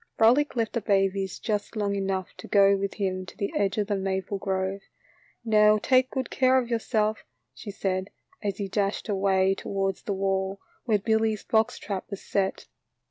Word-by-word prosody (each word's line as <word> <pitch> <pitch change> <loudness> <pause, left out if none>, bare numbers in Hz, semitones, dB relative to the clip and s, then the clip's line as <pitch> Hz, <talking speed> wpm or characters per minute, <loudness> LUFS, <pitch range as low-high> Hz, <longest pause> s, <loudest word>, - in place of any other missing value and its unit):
Frolic 255 +7 +4
left 225 -2 -1
the 235 - -1
babies 195 -1 +1
just 210 0 -3
long 205 -2 0
enough 195 -2 -2
to - - -10
go 200 -1 +5
with 195 0 -3
him 185 -2 -2
to - - -12
the 200 - -3
edge 195 -1 +1
of 210 - +1
the 205 0 -1
maple 190 0 -2
grove. 190 0 -2 0.6
"Now 215 -1 +5
take 255 +4 +3
good 260 -3 -3
care 260 0 +4
of 245 -2 0
yourself," 220 -2 0 0.3
she 210 - -9
said, 190 -1 -2 0.3
as 200 -3 -2
he 200 - -3
dashed 200 +2 -1
away 190 -1 +2
towards 195 -1 -2
the 205 - -3
wall 195 0 -1 0.3
where 220 -4 +3
Billy's 220 0 0
box 220 -1 +1
trap 195 -3 -5
was 200 - -7
set. 195 -1 -1
200 Hz, 180 wpm, -26 LUFS, 195-220 Hz, 0.6 s, go